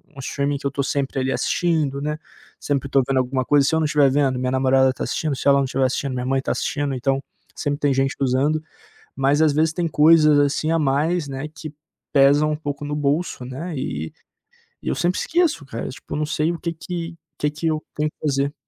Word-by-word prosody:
um - - -11
streaming 140 +2 -1
que 140 - -2
eu - - -3
tô 140 +1 -1
sempre 135 0 -1
ali 130 +1 0
assistindo, 155 -6 0
né. 150 +1 -3 0.4
Sempre 140 -1 -1
tô 135 - +4
vendo 135 - +1
alguma 130 0 0
coisa. 145 0 +4
Se - - 0
eu - - +2
não 155 - +1
tiver 145 -2 +4
vendo, 135 -2 +2
minha 125 0 -1
namorada 130 0 +3
tá - - -5
assistindo. 155 -3 -1
Se 135 - -3
ela 140 0 +6
não 135 - +1
tiver 135 0 0
assistindo, 130 +1 -1
minha 125 0 -3
mãe 135 +1 +1
tá - - -2
assistindo. 145 -2 -1
Então, 135 +2 0 0.4
sempre 145 -1 -2
tem 145 -2 +2
gente 135 +1 0
usando, 140 +4 +1 0.5
mas 135 +3 +2
às 155 -2 +4
vezes 160 +2 +2
tem 170 0 -1
coisas 155 0 +5
assim 145 +2 +1
a 165 - +3
mais, 150 +3 +1
né, 135 +1 -5
que 155 -1 -9 0.4
pesam 145 +2 +5
um 150 - 0
pouco 145 -1 -5
no 150 0 -3
bolso, 145 -1 -1
né? 150 +8 -6
E 80 - -4 0.7
eu - - -2
sempre 175 +1 0
esqueço, 330 - +1
cara. 115 -4 -5
Tipo, 140 - -8
não 155 +1 0
sei 155 +2 0
o 170 - -5
que 170 -1 -3
que 165 0 -6 0.2
que 150 - 0
que 150 +2 -3
eu 155 -1 -1
tenho 150 0 0
que - - -62
fazer. 140 -1 0
145 Hz, 225 wpm, -22 LUFS, 135-155 Hz, 0.7 s, ela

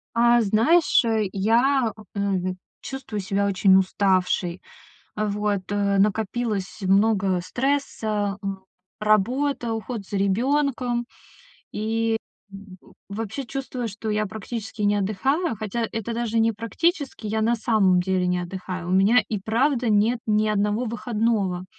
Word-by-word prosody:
А. 235 0 +5
Знаешь, 230 - +4 0.3
я, 230 +5 +2 0.2
м, 190 -2 -1 0.2
чувствую 265 -6 -6
себя 195 +1 0
очень 190 -1 +4
уставшей. 185 -2 +1 0.6
Вот, 210 -2 -1
э, 200 -1 +1
накопилось 210 0 -1
много 195 -1 +2
стресса: 215 -4 -1
м, 195 -1 -5 0.4
работа, 235 +4 +1
уход 225 -2 -5
за 200 - -4
ребёнком. 245 +4 0 0.7
И 225 +1 0 0.9
вообще 220 +6 -5
чувствую, 255 -2 -4
что 220 +1 -6
я 215 0 0
практически 220 +1 -6
не 205 0 +3
отдыхаю. 230 - 0
Хотя 220 +2 -3
это 225 +1 -4
даже 230 -1 0
не 225 0 +3
практически, 255 - -2
я 220 +1 -1
на 230 +2 +2
самом 215 -5 +3
деле 185 0 0
не 180 0 +1
отдыхаю. 180 0 -6
У - - -2
меня 205 +5 +4
и 215 - -1
правда 240 +4 +1
нет 215 +3 +3
ни 215 0 +2
одного 210 +3 0
выходного. 215 -5 -1
215 Hz, 125 wpm, -24 LUFS, 195-235 Hz, 0.9 s, А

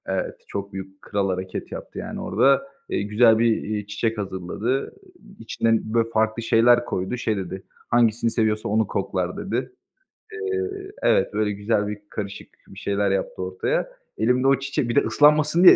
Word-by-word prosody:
Evet, 95 -1 -2
çok 100 0 -5
büyük, 95 0 -8
kral 100 -2 -1
hareket 95 0 -4
yaptı, - - -7
yani, - - -5
orada. 135 - +3 0.2
Eee, - - 0
güzel 110 +2 +4
bir, 115 -1 +3
eee, 105 -1 -3
çiçek 110 +2 -1
hazırladı, 100 +6 -2 0.3
eee, 200 -2 -17
içine, 115 0 +1
böyle, 115 -1 +2
farklı 110 0 0
şeyler 120 +2 +5
koydu. 95 +5 -2
Şey 110 -3 -1
dedi, 95 0 -5 0.3
"Hangisini 115 -1 +3
seviyorsa 110 -2 0
onu 110 0 +2
koklar." 95 -3 -2
dedi. 195 - -3 0.6
Eee 400 -2 -2 0.4
Evet, - - +3
böyle 105 0 +1
güzel 105 +1 0
bir 105 0 -4
karışık 100 -1 -6 0.2
bir 95 - -11
şeyler 100 0 0
yaptı 95 -1 -2
ortaya. 95 0 -1 0.3
Elimde 125 +4 +2
o 135 0 +4
çiçek 135 -3 -2
bir 120 - -1
de 140 - +6
ıslanmasın 150 +3 +4
diye 185 - +11
110 Hz, 170 wpm, -24 LUFS, 100-120 Hz, 0.6 s, diye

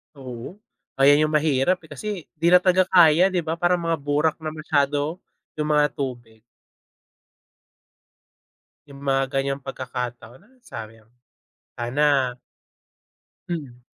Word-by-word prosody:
Oo, 130 +3 -9 0.4
ayan 145 +3 +5
yung 155 - -2
mahirap 150 +2 +2
eh, 160 - -17
kasi 145 +9 -7 0.3
di 165 - +2
na 180 - +7
talaga 185 0 +3
kaya, 175 -1 +6
di 185 -3 -1
ba, 160 +1 -3
parang 175 0 +1
mga 165 -2 0
burak 145 +2 0
na 160 - -6
masyado, 150 +1 -1 0.4
yung 150 - 0
mga 150 -1 +3
tubig. 120 -5 -6 2.5
Yung 140 -1 -13
mga 135 -1 +1
ganyang 135 0 0
pagkakataon 125 -2 -6
ah, 260 - -27
sayang, 110 - -10 0.7
sana 130 0 +1 1.1
Mm. 130 -7 -6
145 Hz, 120 wpm, -23 LUFS, 130-160 Hz, 2.5 s, na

